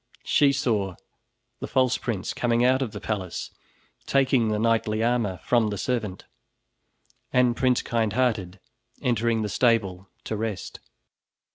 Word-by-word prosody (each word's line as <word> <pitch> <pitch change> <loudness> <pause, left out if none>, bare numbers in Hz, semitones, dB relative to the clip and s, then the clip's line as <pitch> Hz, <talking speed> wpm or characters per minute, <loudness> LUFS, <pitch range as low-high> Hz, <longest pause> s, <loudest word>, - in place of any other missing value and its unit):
She 145 -1 +4
saw 105 -9 0 0.6
the - - -5
false 130 -1 +2
prince 105 -6 -3
coming 120 0 +1
out 130 +1 +3
of 130 - -1
the - - -7
palace, 95 -5 -4 0.6
taking 130 -4 +3
the 105 -1 0
knightly 110 -1 +1
armor 115 -6 0
from 120 -3 +2
the 105 -1 -3
servant, 105 -5 -3 1.1
and 125 -2 +3
Prince 125 0 +2
Kindhearted 110 -4 0 0.4
entering 115 -3 +1
the - - -1
stable 100 -5 +1
to 110 - -3
rest. 110 -3 -4
115 Hz, 130 wpm, -25 LUFS, 105-125 Hz, 1.1 s, She